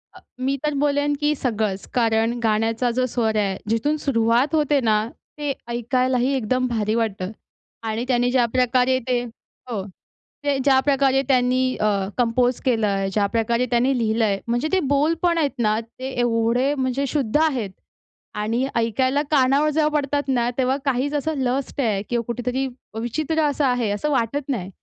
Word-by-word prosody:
अ, - - -12 0.2
मी 270 +2 0
तर 300 -1 0
बोलेन 290 0 +1
की 295 0 +2
सगळंच. 215 -7 -2
कारण 230 -1 +1
गाण्याचा 225 +2 +1
जो 255 - +3
स्वर 225 -3 -1
आहे, 195 -2 0
जिथून 290 +7 +1
सुरुवात 245 +1 +1
होते 295 -2 +2
ना, 215 -2 +3 0.4
ते 290 -2 -2
ऐकायलाही 250 +2 0
एकदम 255 +2 0
भारी 220 -2 -1
वाटतं. 205 -4 -2 0.5
आणि 225 +1 -2
त्यांनी 245 -1 +2
ज्या 250 -2 +3
प्रकारे 255 +1 +3
ते 245 -1 +1 0.5
हो. 210 -5 -2 0.6
ते 280 -1 +2
ज्या 270 -2 +5
प्रकारे 270 -1 +3
त्यांनी 255 -1 +2 0.2
अ, 215 - +3 0.3
कंपोज 245 +1 +1
केलंय, 205 -5 +1
ज्या 205 -1 +2
प्रकारे 235 +2 +1
त्यांनी 250 +2 +2
लिहिलंय. 220 -3 +1
म्हणजे 240 +6 0
ते 380 - +4
बोल 300 +4 +3
पण 345 -1 +2
आहेत 285 -5 -1
ना 215 -1 +2
ते 255 +3 -8
एवढे 240 +4 +1
म्हणजे 265 +1 -1
शुद्ध 270 -4 -2
आहेत 250 -10 0 0.7
आणि 230 +5 0
ऐकायला 255 +5 +1
कानावर 280 +2 +3
जेव्हा 300 0 +2
पडतात 285 +1 -1
ना, 245 -2 +1
तेव्हा 260 +1 +1
काहीच 275 +2 0
असं 310 +2 -1
लस्ट 265 +2 -1
आहे 210 -5 0
किंवा 235 -1 0
कुठेतरी 250 +3 -2 0.3
विचित्र 310 +7 -1
असं 290 -1 +1
आहे 245 -4 +1
असं 210 +9 -1
वाटत 270 +3 -1
नाही. 195 -8 -2
250 Hz, 160 wpm, -22 LUFS, 230-275 Hz, 0.7 s, ज्या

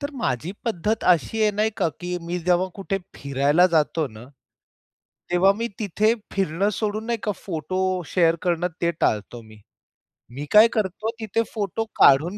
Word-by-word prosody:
तर 285 0 -4
माझी 130 +8 -1
पद्धत 220 -1 -1
अशी 220 +7 -3
आहे 215 - +4
नाही 215 +2 +1
का - - +1
की 180 0 -3
मी 175 +1 -2
जेव्हा 180 +1 +2
कुठे 195 0 -3 0.2
फिरायला 140 +5 +2
जातो 160 -2 +1
ना, 110 0 -12 1.1
तेव्हा 180 +3 +4
मी 230 +1 -1
तिथे 215 +2 +2 0.2
फिरणं 195 +1 0
सोडून 215 0 -2
नाही 235 -1 -1
का 210 - 0
फोटो 185 +2 -1
शेअर 165 -1 +2
करणं 175 0 0
ते 170 - +3
टाळतो 110 +3 0
मी. 110 -1 -16 0.7
मी 140 +4 -6
काय 215 +2 +8
करतो 215 +1 -1
तिथे 220 0 -1
फोटो 215 0 -2 0.2
काढून 160 +9 +5
180 Hz, 160 wpm, -23 LUFS, 160-210 Hz, 1.1 s, काय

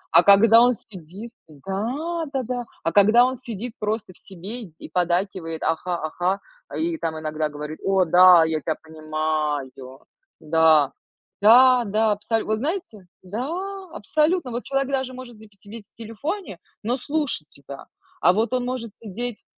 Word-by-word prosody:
А 170 - +9
когда 220 +4 +7
он 245 0 +4
сидит, 195 +3 -11 0.2
да, 230 - -4
да, 265 -1 -1
да, 245 0 -4 0.2
а 165 - 0
когда 215 +6 +6
он 260 +1 -1
сидит 235 -1 -7
просто 215 -2 -3
в - - -23
себе 200 +6 -8
и 165 -6 -12
поддакивает: 175 -2 -1
"Ага, 175 +2 -1
ага". 175 +5 -2 0.3
А, - - -6
и 330 0 -1
там 160 - -3
иногда 155 0 -2
говорит: 150 +1 -7
"О 190 -1 +2
да, 180 0 +7
я 160 -2 -1
тя 160 - -2
понимаю!" 155 -3 -2 0.7
Да. 155 -2 +4 0.5
Да, 250 +4 +7
да, 215 +1 +1
абсолютно. 215 +1 -2
Вот 215 - -1
знаете, 275 - -4 0.2
да, 215 +8 -4 0.5
абсолютно. 305 - 0
Вот 240 +1 -4
человек 275 0 -1
даже 265 -1 -2
может 250 -2 -10
вз 220 - -15
сидеть 210 +1 -11
в - - -37
телефоне, 230 - -6 0.2
но 235 +4 0
слушать 285 - -2
тебя. 140 -1 -12 0.3
А 180 - +5
вот 220 +4 0
он 250 -1 0
может 245 -3 -4
сидеть. 230 +2 -6
210 Hz, 160 wpm, -23 LUFS, 165-245 Hz, 0.7 s, А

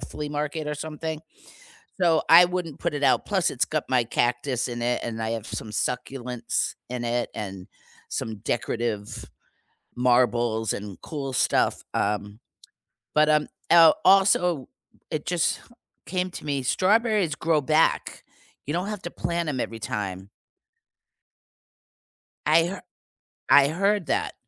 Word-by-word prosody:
flea 150 -1 -6
market 150 +1 -3
or 150 - -2
something, 155 +1 -5 0.8
so, 170 -3 +3
I 175 +2 +9
wouldn't 175 -4 -4
put 170 -2 -2
it 145 -1 -3
out, - - +3
plus 190 -5 +1
it's 125 - +1
got 155 -1 -2
my 125 -2 +2
cactus 120 +2 0
in 120 0 -5
it, 120 +1 0
and 115 -1 -4
I 110 0 -2
have 115 -2 -4
some 110 - -5
succulents 125 +2 -2
in 125 -1 -4
it 120 0 -1
and 95 -4 -6 0.4
some 110 -1 -4
decorative 115 -1 -3 0.7
marbles 120 -3 +2
and 100 -3 -7
cool 140 -4 -5
stuff, - - +1
um. 105 0 -1 0.8
But 155 0 +4
um, 150 -1 +3 0.2
el 165 -2 +8
also, 180 -6 +4 0.4
it 155 -2 -3
just 175 -2 0 0.5
came 185 0 -2
to - - -8
me, 140 -2 -1
strawberries 200 - +2
grow 160 -1 +1
back, 155 +3 +1 0.4
you 145 - -3
don't 180 +3 -1
have 210 -2 -5
to 175 - -5
plant 170 -1 -2
'em 130 -4 -2
every 115 -1 -4
time. 100 -5 -4 2.2
I 165 - +5
her 185 +2 -5 0.7
I 140 -1 +7
heard 195 +3 0
that, - - -1
145 Hz, 140 wpm, -25 LUFS, 120-165 Hz, 2.2 s, I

